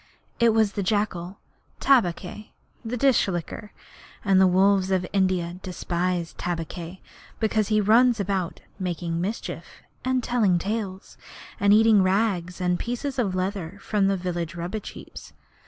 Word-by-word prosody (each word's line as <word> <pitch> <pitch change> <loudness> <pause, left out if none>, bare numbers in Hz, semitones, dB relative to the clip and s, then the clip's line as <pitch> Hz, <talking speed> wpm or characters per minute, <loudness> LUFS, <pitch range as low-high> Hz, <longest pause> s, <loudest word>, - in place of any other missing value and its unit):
It 235 -1 +5
was 220 -2 +3
the 200 - -3
jackal 195 -2 -1 0.4
Tabaqui, 210 -4 +1 0.3
the 240 +2 -3
Dish 265 -3 +3
licker 185 +3 -5 0.5
and 195 -1 +5
the 190 - +6
wolves 190 +1 +3
of 185 -1 +1
India 185 -2 0
despise 180 -1 -2
Tabaqui 175 +1 -5 0.4
because 215 -2 +1
he 215 -1 +2
runs 230 +3 +4
about 190 -3 -2 0.2
making 170 -2 -2
mischief, 205 +5 -5 0.2
and 255 -1 0
telling 220 -8 +2
tales, 195 0 -4 0.4
and 200 0 +4
eating 215 -1 +6
rags 185 -2 0
and 180 -1 0
pieces 250 +3 -3
of 195 -6 0
leather 185 -1 -3
from 200 -1 +1
the 195 0 +1
village 175 -2 -3
rubbish 180 +5 -5
heaps. - - -11
195 Hz, 140 wpm, -25 LUFS, 180-215 Hz, 0.5 s, the